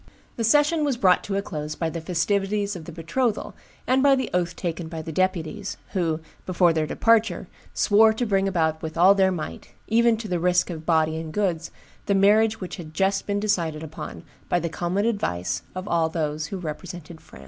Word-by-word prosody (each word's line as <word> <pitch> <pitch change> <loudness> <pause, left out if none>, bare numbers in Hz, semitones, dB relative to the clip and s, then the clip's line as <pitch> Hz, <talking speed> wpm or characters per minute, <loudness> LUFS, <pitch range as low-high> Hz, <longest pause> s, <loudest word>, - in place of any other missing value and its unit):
"The 230 - -2
session 295 +7 +3
was 280 -4 0
brought 185 -6 +4
to 195 - -3
a 200 - 0
close 150 -5 -5
by 165 -1 -2
the 165 - -5
festivities 200 +4 0
of 165 -3 -8
the 170 - -8
betrothal, 205 +8 -2 0.3
and 260 +1 +3
by 275 0 +5
the 260 - -3
oath 175 -1 0
taken 170 -2 -4
by 160 -1 -6
the 160 - -6
deputies, 185 +3 -2
who, 165 -4 -1 0.3
before 175 -2 +3
their 155 -1 0
departure, 225 -4 +2 0.3
swore 220 +2 +5
to 220 +3 -2
bring 195 -2 +1
about 160 -4 0
with 160 0 -6
all 185 +4 +7
their 190 -1 +3
might, 170 -4 -6
even 230 0 +3
to 220 0 -6
the 180 -3 -1
risk 180 +1 +2
of 160 -2 -8
body 160 -1 +2
and 160 -1 -6
goods, 180 -6 -1 0.4
the 200 - +2
marriage 215 +3 +4
which 185 - -6
had 160 -3 -10
just 195 +1 +1
been 205 0 0
decided 170 -7 -1
upon 160 0 -8 0.3
by 175 - +2
the 170 0 -3
common 180 +5 -1
advice 85 - -1
of 185 +2 -5
all 165 -1 +1
those 155 -2 -2
who 195 - -5
represented 165 0 -7
France. - - -15
180 Hz, 205 wpm, -24 LUFS, 160-205 Hz, 0.4 s, all